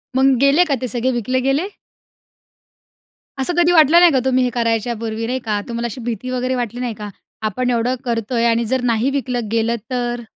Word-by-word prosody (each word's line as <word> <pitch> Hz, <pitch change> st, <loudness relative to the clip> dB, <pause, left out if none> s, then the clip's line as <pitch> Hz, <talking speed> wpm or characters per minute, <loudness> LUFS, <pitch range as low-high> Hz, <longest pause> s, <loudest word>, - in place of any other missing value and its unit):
मग 265 Hz, 0 st, +4 dB
गेले 280 Hz, +6 st, +5 dB
का 285 Hz, -, 0 dB
ते 255 Hz, -, -2 dB
सगळे 245 Hz, +3 st, -1 dB
विकले 255 Hz, +1 st, -1 dB
गेले? 270 Hz, +7 st, 0 dB, 1.7 s
असं 270 Hz, +7 st, -1 dB
कधी 345 Hz, 0 st, +4 dB
वाटलं 325 Hz, 0 st, +6 dB
नाही 350 Hz, -1 st, +6 dB
का 265 Hz, -, +2 dB
तुम्ही 255 Hz, -1 st, +2 dB
हे 250 Hz, -, +1 dB
करायच्या 230 Hz, 0 st, 0 dB
पूर्वी 225 Hz, 0 st, -3 dB
नाही 255 Hz, +1 st, -2 dB
का, 210 Hz, -2 st, 0 dB
तुम्हाला 235 Hz, 0 st, -3 dB
अशी 235 Hz, +2 st, -5 dB
भीती 235 Hz, +1 st, -4 dB
वगैरे 255 Hz, +1 st, -1 dB
वाटली 240 Hz, -1 st, -3 dB
नाही 240 Hz, -3 st, -2 dB
का? 210 Hz, 0 st, -7 dB, 0.3 s
आपण 220 Hz, +4 st, -1 dB
एवढं 245 Hz, +1 st, +1 dB
करतो 230 Hz, 0 st, -2 dB
आहे 235 Hz, 0 st, +2 dB
आणि 235 Hz, 0 st, +2 dB
जर 260 Hz, +2 st, 0 dB
नाही 230 Hz, +4 st, +1 dB
विकलं 250 Hz, -4 st, -2 dB
गेलं 230 Hz, +1 st, +1 dB, 0.2 s
तर? 240 Hz, -1 st, -2 dB
245 Hz, 205 wpm, -19 LUFS, 230-260 Hz, 1.7 s, वाटलं